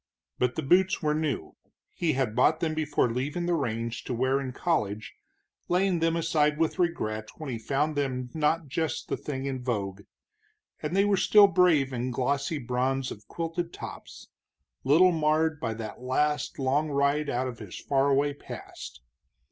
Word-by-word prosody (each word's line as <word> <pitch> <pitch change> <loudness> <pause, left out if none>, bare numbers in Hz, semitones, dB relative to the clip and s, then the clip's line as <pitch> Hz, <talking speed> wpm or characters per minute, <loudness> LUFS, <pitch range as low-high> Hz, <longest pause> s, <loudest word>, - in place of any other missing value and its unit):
But 125 0 +1
the 160 - -2
boots 185 +6 +3
were 150 0 +2
new 150 - -2 0.4
he 165 -3 0
had 130 -5 -1
bought 155 +6 +4
them 160 -2 0
before 150 -6 0
leaving 145 +8 -2
the 175 - +1
range, 115 -5 -2
to 125 - -2
wear 130 +3 +1
in 130 -2 -4
college, 110 - -1 0.5
laying 180 0 +2
them 165 0 +2
aside 155 -2 +2
with 165 +3 0
regret 110 -12 -1
when 155 -4 -5
he 115 - -4
found 145 +6 0
them 130 -3 -2
not 160 +1 +1
just 160 +3 -3
the - - 0
thing 135 -2 -5
in 135 -2 -3
vogue 100 -5 -2 0.8
and 155 +4 -2
they 195 +1 +4
were 205 -1 +3
still 205 +2 +7
brave 175 -8 +3
in 125 +1 -2
glossy 140 +5 -1
bronze 130 +1 -1
of 105 -1 -10
quilted 170 +1 -3
tops, - - -9 0.6
little 165 +7 +5
marred 155 -1 +1
by 115 -4 -2
that 110 +1 -7
last 150 +6 0
long 140 +3 +1
ride 140 +1 +1
out 130 +1 -1
of 120 -2 -7
his 105 -5 -8
far 140 0 +1
away 140 +1 +2
past. 65 - -10
145 Hz, 170 wpm, -28 LUFS, 125-160 Hz, 0.8 s, still